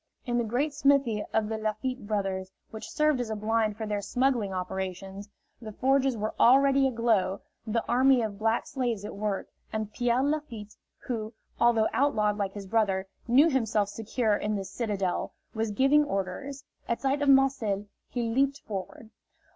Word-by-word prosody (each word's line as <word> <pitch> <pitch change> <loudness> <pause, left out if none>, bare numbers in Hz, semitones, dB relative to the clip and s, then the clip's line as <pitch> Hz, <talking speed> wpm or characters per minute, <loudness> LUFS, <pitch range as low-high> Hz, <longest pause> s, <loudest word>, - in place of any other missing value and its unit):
In 240 -2 0
the - - +1
great 255 +7 -1
smithy 275 -7 +2
of 220 -1 +1
the 220 0 -3
Lafitte 215 +2 -3
brothers, 195 -3 -2 0.2
which 220 - -8
served 305 -3 +2
as 235 - -4
a 220 - -2
blind 215 0 0
for 220 - -4
their 210 -1 -2
smuggling 245 -3 0
operations, 190 +2 -5 0.3
the 215 -2 -8
forges 270 +1 +2
were 215 +1 -2
already 275 +2 +5
aglow, 225 -6 +1 0.3
the 225 +1 -1
army 255 0 +4
of 205 -2 -4
black 225 +1 +1
slaves 240 -6 -2
at - - -6
work, 205 -1 -3 0.2
and 215 -1 -3
Pierre 245 +1 +1
Lafitte, 275 -8 -3 0.3
who, 225 -2 -4 0.3
although 230 -2 +4
outlawed 210 -7 +2
like 195 -1 -1
his 205 -1 -7
brother, 195 -2 +1 0.2
knew 265 +7 +6
himself 225 -8 +1
secure 220 +1 0
in 210 +1 -2
this 195 -1 -5
citadel, 200 -4 -2 0.2
was 220 0 -1
giving 270 +8 +4
orders. 265 +4 -4 0.3
At 235 - 0
sight 275 +1 0
of 285 - +2
Marcel 260 -7 +3 0.2
he 245 - -2
leaped 270 +5 +1
forward. 210 +2 -7
225 Hz, 165 wpm, -28 LUFS, 205-260 Hz, 0.3 s, knew